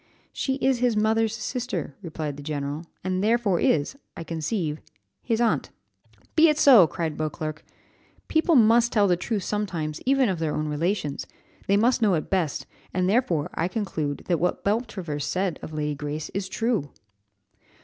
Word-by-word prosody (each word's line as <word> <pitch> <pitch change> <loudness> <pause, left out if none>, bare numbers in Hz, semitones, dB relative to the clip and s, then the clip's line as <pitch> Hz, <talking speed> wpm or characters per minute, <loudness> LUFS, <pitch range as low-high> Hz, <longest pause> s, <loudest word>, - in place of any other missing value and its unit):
"She 265 - -1
is 265 -2 +1
his 245 -3 +2
mother's 220 +1 +2
sister," 225 - -3
replied 155 -5 -4
the 145 - -9
general, 145 +2 -4 0.2
"and 185 +1 -1
therefore 215 -5 +2
is, 145 - +1 0.2
I 165 - -5
conceive, 160 -1 -2 0.4
his 230 -2 -1
aunt." 235 -1 +1 0.7
"Be 325 0 +7
it 300 - +2
so," 250 - +8
cried 160 -2 -3
Beauclerc; 155 0 -4 0.6
"people 320 +1 +3
must 235 0 +5
tell 205 -3 +3
the 180 - +4
truth 205 +2 -2
sometimes, 175 -8 -3
even 270 -1 +3
of 185 -5 -1
their 160 -2 -1
own 155 - -1
relations; 150 0 -2 0.4
they 200 - +4
must 235 +4 +3
know 205 -5 +4
it 155 - -4
best, 160 -8 0 0.3
and 185 0 0
therefore 185 - +1
I 165 - 0
conclude 165 -8 -3
that 175 -3 +1
what 180 - 0
Beltravers 195 - -2
said 185 +2 -1
of - - -7
Lady 150 -1 -2
Grace 150 +1 -5
is 195 -1 -4
true." 225 - -1
185 Hz, 165 wpm, -25 LUFS, 155-225 Hz, 0.7 s, so